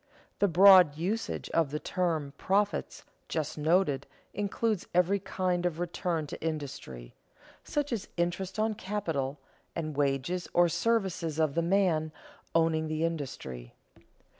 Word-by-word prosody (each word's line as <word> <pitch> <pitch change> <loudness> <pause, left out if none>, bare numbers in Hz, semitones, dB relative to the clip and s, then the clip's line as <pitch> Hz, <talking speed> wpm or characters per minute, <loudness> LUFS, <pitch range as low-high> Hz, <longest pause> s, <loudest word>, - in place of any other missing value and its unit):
The 205 - +4
broad 180 -3 +7
usage 200 +8 -2
of 165 -4 +2
the 150 - -2
term 160 -7 -1
profits 205 +2 0 0.2
just 155 -3 -2
noted 155 -3 +1 0.3
includes 205 0 -1
every 180 +3 +3
kind 180 -2 -1
of 175 -3 -1
return 170 -2 -2
to - - -8
industry: 140 - -5 0.5
such 290 -3 -2
as 220 - -3
interest 180 +3 -1
on 215 0 +1
capital, 165 -10 -3 0.4
and 155 -3 -3
wages 145 +5 0
or 175 0 +5
services 185 -6 0
of 155 -3 +2
the 170 - +1
man 170 -3 +2 0.4
owning 160 -1 +2
the 155 +1 -1
industry. 95 - -5
170 Hz, 130 wpm, -30 LUFS, 150-190 Hz, 0.5 s, broad